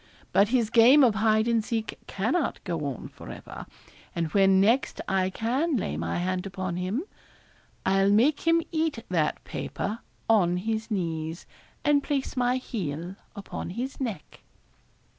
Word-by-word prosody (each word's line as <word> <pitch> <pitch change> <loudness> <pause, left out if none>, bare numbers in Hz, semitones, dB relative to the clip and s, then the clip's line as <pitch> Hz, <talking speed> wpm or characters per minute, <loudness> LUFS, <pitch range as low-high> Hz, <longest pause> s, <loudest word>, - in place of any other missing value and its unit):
But 200 +2 +5
his 235 -1 +1
game 250 +5 +7
of 240 -4 +5
hide 220 +1 +2
and 230 -2 +2
seek 225 0 -3
cannot 250 - -1
go 165 -5 -3
on 135 -4 -6
for - - -12
ever; - - -9 0.5
and 165 -2 -2
when 195 -1 +5
next 230 +7 +2
I 190 -1 +1
can 255 - 0
lay 75 - -2
my 85 +2 -2
hand 185 +1 -1
upon 185 -2 -4
him, 190 - -2 0.8
I'll 195 +1 +3
make 260 +10 +3
him 330 0 +4
eat 315 -8 -1
that 165 -4 0
paper 215 +3 -4 0.3
on 180 -6 +3
his 220 +4 -2
knees, 165 -4 -3 0.4
and 290 -1 +4
place 275 -1 -2
my 250 0 +2
heel 175 - -4 0.2
upon 200 - -6
his 245 +9 -5
neck.' 220 - -5
210 Hz, 150 wpm, -27 LUFS, 185-245 Hz, 0.8 s, game